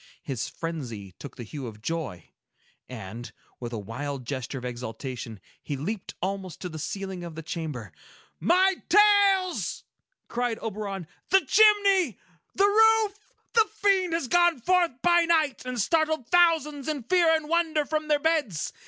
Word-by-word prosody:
His 130 -6 -4
frenzy 125 - -6
took 140 - -9
the 120 - -7
hue 130 +3 -7
of 105 -2 -10
joy, 135 - -5 0.6
and, 115 -1 -8 0.3
with 120 -1 -6
a 115 - -4
wild 130 +6 -5
gesture 130 +1 -4
of 125 - -7
exultation, 120 -2 -6 0.2
he 145 - -4
leaped 190 +8 -5
almost 190 -3 -4
to 180 - -4
the 160 -1 -7
ceiling 190 0 -5
of 170 -2 -8
the 160 - -7
chamber. 150 - -5 0.5
"My 370 - +3
tales!" 400 -2 +4 0.4
cried 240 -1 -1
Oberon. 200 -5 -5 0.2
"The 385 +1 +5
chimney! 400 - +4 0.4
The 395 - +4
roof! 435 0 +4 0.3
The 450 -2 +4
Fiend 390 -5 +1
has 330 -6 -1
gone 345 +1 +3
forth 345 -1 +1
by 345 -1 +5
night, 315 -5 +1
and 250 -1 -3
startled 315 - +1
thousands 320 -5 +3
in 300 -5 -2
fear 335 +3 +4
and 315 -1 -3
wonder 320 -2 +1
from 310 +1 -2
their 300 -1 +3
beds! 290 - 0
245 Hz, 155 wpm, -26 LUFS, -, 0.6 s, The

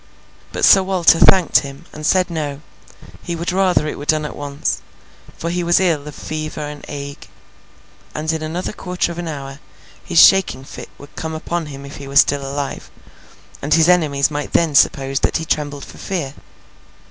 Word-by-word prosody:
But - - +1
Sir 195 - +7
Walter 185 -3 +3
thanked 185 -4 +6
him, 140 -1 -9
and 155 - -9
said 185 0 +2
no, 150 -3 -4 0.6
he 170 - -4
would 170 +2 -3
rather 185 -4 +2
it 150 - -4
were 145 - -7
done 155 +1 +1
at - - -6
once, 145 0 -3 0.6
for 170 - -3
he 175 0 -1
was 175 0 +3
ill 165 -6 0
of 150 - -8
fever 155 0 -5
and 145 -1 -7
ague, 140 0 -7 0.9
and 155 +1 -1
in 160 - -3
another 170 +6 -4
quarter 180 -3 -2
of 170 - -7
an 175 - -4
hour 140 -2 -7 0.4
his 175 - -3
shaking 195 -8 +5
fit - - -10
would 145 - -15
come 160 0 -4
upon 165 +1 -3
him 140 -1 -9
if 140 - -9
he 140 - -9
were 140 - -8
still 140 -1 +4
alive, 140 +1 -5 0.7
and 150 +2 +2
his 165 0 +4
enemies 155 -6 +3
might 145 0 -4
then 165 -3 +2
suppose 135 -1 +3
that - - +1
he 165 - -5
trembled 145 -2 -2
for - - -14
fear. 165 -8 -3
155 Hz, 190 wpm, -19 LUFS, 140-170 Hz, 0.9 s, Sir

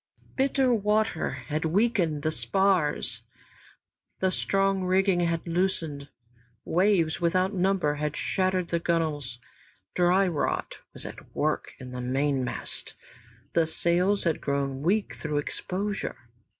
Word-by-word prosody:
Bitter 265 -1 +2
water 210 -4 +1
had 155 +1 -4
weakened 170 -4 +1
the 155 - +1
spars, 160 +4 +1 1.0
the 185 0 +2
strong 195 0 +1
rigging 185 0 +3
had 170 -1 0
loosened, 165 -5 -1 0.6
waves 175 -3 +2
without 185 +3 +2
number 185 -5 +2
had 150 -1 -2
shattered 185 -2 0
the 170 - +1
gunwales, 155 -7 -1 0.6
dry 180 +2 +4
rot 165 -5 -2 0.2
was - - -7
at - - -10
work - - -1
in 125 -1 -9
the 125 0 -5
mainmast, 135 +1 -2 0.6
the 165 -1 +3
sails 180 +5 +2
had 165 -3 0
grown 140 -1 -1
weak 195 +7 +1
through 150 -1 -3
exposure. 195 +7 -3
175 Hz, 120 wpm, -27 LUFS, 150-195 Hz, 1.0 s, dry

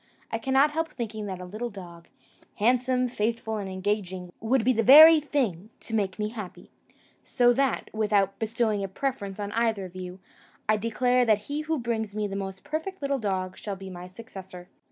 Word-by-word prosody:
I 225 - -1
cannot 270 +5 +3
help 325 +1 -1
thinking 220 -3 -5
that 190 -2 -5
a 180 - -7
little 215 +6 -5
dog, 175 -5 -11 0.5
handsome, 250 +3 +2
faithful, 225 -1 -2
and 200 -2 -4
engaging, 185 -2 -3
would 225 +1 +1
be 255 - +4
the 225 - +1
very 310 +7 +10
thing 230 - -2
to 225 - -9
make 200 -4 0
me 210 0 -2
happy; 215 -5 -9 0.5
so 245 -1 +3
that, 270 0 0
without 205 -3 +1
bestowing 220 -2 0
a - - -2
preference 205 -2 -4
on 205 0 -4
either 225 -3 0
of 180 0 -12
you, 185 0 -7 0.5
I 215 0 +3
declare 245 +3 +2
that 215 -2 +2
he 290 +6 -3
who 315 +1 -1
brings 225 -4 -3
me 215 -1 -1
the 195 -1 -4
most 195 -1 -5
perfect 320 +6 -4
little 280 -1 0
dog 190 -3 -3
shall 205 -2 -4
be 190 0 -9
my 180 0 -8
successor." 185 -3 -11
215 Hz, 190 wpm, -27 LUFS, 195-250 Hz, 0.5 s, very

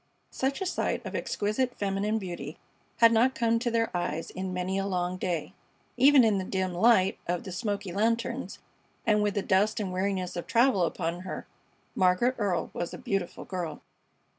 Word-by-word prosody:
Such 270 +6 -1
a - - 0
sight 365 - -1
of - - -5
exquisite 245 +5 -1
feminine 200 +2 0
beauty 175 -7 -6 0.4
had 230 -1 +7
not 240 +3 +3
come 230 -1 +2
to 240 +1 -1
their 230 -4 0
eyes 165 -2 -2
in 185 0 -4
many 185 +1 -1
a 195 - -1
long 180 -1 -1
day. 175 -4 -2 0.4
Even 275 -1 +7
in 215 -3 +3
the - - -2
dim 185 -1 -2
light 190 0 +4
of 175 0 -1
the 190 - -7
smoky 205 -1 -3
lanterns, 225 +5 -1 0.5
and 210 -2 +3
with 205 0 0
the 200 - 0
dust 205 +4 +2
and 190 -3 -3
weariness 185 -1 -1
of 175 - -5
travel 230 -6 +4
upon 170 0 -2
her, 185 +1 -6 0.5
Margaret 185 +7 +3
Earle 195 -5 0
was 175 - -4
a - - -8
beautiful 195 -3 -3
girl. 175 -4 -5
195 Hz, 180 wpm, -28 LUFS, 180-230 Hz, 0.5 s, had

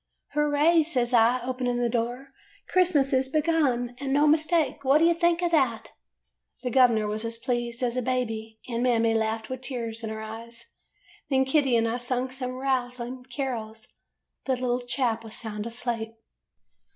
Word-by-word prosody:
" - - -35
'Hooray,' 295 +3 +3
says 255 -6 0
I, 240 +2 +4
opening 250 -1 -2
the 240 - +2
door. 240 +3 -2 0.4
'Christ 365 -2 +2
mas 275 -1 +3
is 260 0 +2
begun 285 -6 +1
and 275 -1 -3
no 290 +2 +4
mistake. 310 -2 +2
What 270 +2 +5
do 320 - +4
you 340 - +5
think 340 +1 +1
of 345 - +1
that.' 260 -8 +1 0.7
"The 250 - -2
gov'ner 235 -4 +4
was 215 +1 -3
as 230 0 -3
pleased 240 0 -2
as 240 -1 0
a 255 - 0
baby, 225 -3 -3
and 235 -1 -2
Mammy 230 -2 +2
laughed 220 0 -1
with 260 -1 -5
tears 235 -3 -5
in 220 - -3
her 220 0 -5
eyes. 230 +2 -9 0.6
Then 265 -1 +3
Kitty 265 -2 +2
and 230 0 +2
I 230 +2 -1
sung 250 +1 -2
some 255 -1 -3
rousing 250 -1 -2
carols. 235 -4 -5 0.6
The 265 - +1
little 250 -1 -1
chap 245 -2 -1
was 220 -1 -9
sound 215 -1 -5
asleep. 230 -1 -3
250 Hz, 175 wpm, -26 LUFS, 230-270 Hz, 0.7 s, What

